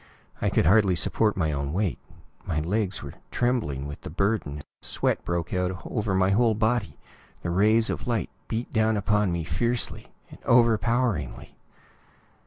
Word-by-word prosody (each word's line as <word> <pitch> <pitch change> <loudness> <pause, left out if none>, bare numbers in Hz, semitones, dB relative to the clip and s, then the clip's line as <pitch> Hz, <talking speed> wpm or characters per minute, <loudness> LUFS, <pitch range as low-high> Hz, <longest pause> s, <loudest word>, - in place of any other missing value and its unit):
I - - +2
could - - +2
hardly 95 +1 +5
support 105 +4 +1
my 80 -4 +1
own 70 0 -2
weight; 95 -1 0 0.4
my 80 -4 -1
legs 95 +3 -1
were 70 - -7 0.2
trembling 110 - 0
with 75 0 -7
the - - -7
burden; 85 -5 -1 0.2
sweat - - -1
broke 85 -1 -2
out 90 -1 -1
over 105 -4 -1
my 95 +1 +3
whole 110 +2 +3
body; 110 -7 0 0.5
the 85 - -1
rays 110 +5 +4
of - - -5
light 115 - -1 0.2
beat 115 +2 -4
down 110 -1 +2
upon 105 -1 +2
me 85 -1 -1
fiercely, 120 +8 -2 0.3
overpoweringly.... 115 - +2
100 Hz, 150 wpm, -26 LUFS, 85-110 Hz, 0.5 s, hardly